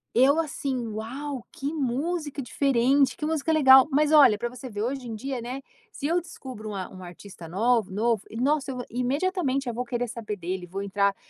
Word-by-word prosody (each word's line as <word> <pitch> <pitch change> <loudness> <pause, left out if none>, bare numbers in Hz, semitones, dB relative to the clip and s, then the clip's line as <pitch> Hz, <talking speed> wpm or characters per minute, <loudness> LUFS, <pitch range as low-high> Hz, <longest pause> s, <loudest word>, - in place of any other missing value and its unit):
Eu 270 +6 +5
assim, 275 -6 -2
uau! 250 +5 -5
Que 280 +3 -4
música 295 +2 -2
diferente, 270 +1 +2
que 300 - -3
música 320 0 0
legal, 265 -4 +7
mas 295 +2 +3
olha 280 -9 +7
pra 240 - -2
você 250 +1 -9
ver 210 -2 -4
hoje 255 +1 -3
em 225 - -5
dia, 260 +2 -4
né, 250 +3 -5 0.3
se 285 - -7
eu 340 +4 +2
descubro 260 -9 -9
um 205 - -5
a 185 -2 -4
um 185 - -11
artista 175 0 -11
nova 220 +4 +1
novo 220 +2 +1
e 225 - -8
nossa, 280 +2 +1
eu 250 -1 -5
imediatamente, 275 - 0
eu 240 - -2
vou 245 +2 -2
querer 245 0 -2
saber 225 -3 -5
dele. 180 0 -4
Vou 195 +3 -5
entrar 200 0 +1
250 Hz, 200 wpm, -26 LUFS, 220-280 Hz, 0.3 s, legal